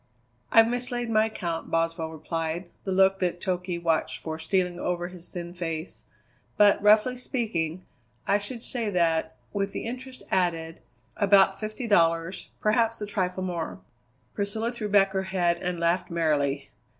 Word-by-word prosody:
"I've 225 0 +7
mislaid 245 -1 -2
my 215 0 +4
account," 170 -6 -4
Boswell 165 -1 0
replied, 165 +2 -4
the 190 - -2
look 190 +1 +4
that 175 -1 -1
Toky 180 -1 -2
watched 165 -2 0
for 160 0 -5
stealing 180 +1 0
over 175 -1 -2
his 180 -1 -9
thin 175 -1 -7
face; 165 -1 -5 0.5
"but, 205 -1 +5
roughly 215 +4 +5
speaking, 185 - -2 0.4
I 200 - +3
should 230 +3 -6
say 235 -5 -2
that, 165 -5 +1 0.2
with 200 -1 -1
the - - -4
interest 255 +2 -6
added, 165 -3 0 0.4
about 195 -1 +5
fifty 215 +3 -4
dollars, 165 -2 +2
perhaps 225 +1 +2
a 210 - -3
trifle 185 -3 -2
more." 170 - -3 0.5
Priscilla 220 +3 -2
threw 225 -4 -4
back 195 -1 +4
her 190 - +1 0.2
head 175 -1 +3
and 180 -1 -2
laughed 170 +2 +1
merrily. 150 -4 0
185 Hz, 150 wpm, -27 LUFS, 165-210 Hz, 0.5 s, I've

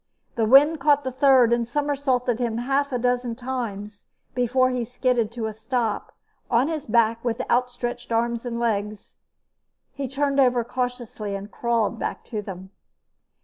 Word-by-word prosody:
The 225 -2 0
wind 290 +6 +6
caught 290 0 +3
the 260 - -3
third 260 -3 +5
and 235 -1 0
somersaulted 265 -3 0
him 235 -2 -1
half 275 +4 0
a 250 - 0
dozen 245 -1 0
times 225 -5 -5 0.3
before 255 +1 +2
he 250 -1 -1
skidded 245 -1 0
to 230 -2 -3
a 220 - -3
stop 225 0 -2 0.4
on 245 +5 +3
his 315 -3 -4
back 230 0 +2
with 235 0 -1
outstretched 245 -1 -1
arms 235 0 0
and 235 -2 -4
legs. 210 -2 -2 0.8
He 275 0 -4
turned 280 +1 0
over 250 -3 +4
cautiously 240 -4 -4
and 200 +1 -7
crawled 230 -1 0
back - - -4
to 215 - -1
them. 190 -2 -9
245 Hz, 155 wpm, -24 LUFS, 225-260 Hz, 0.8 s, wind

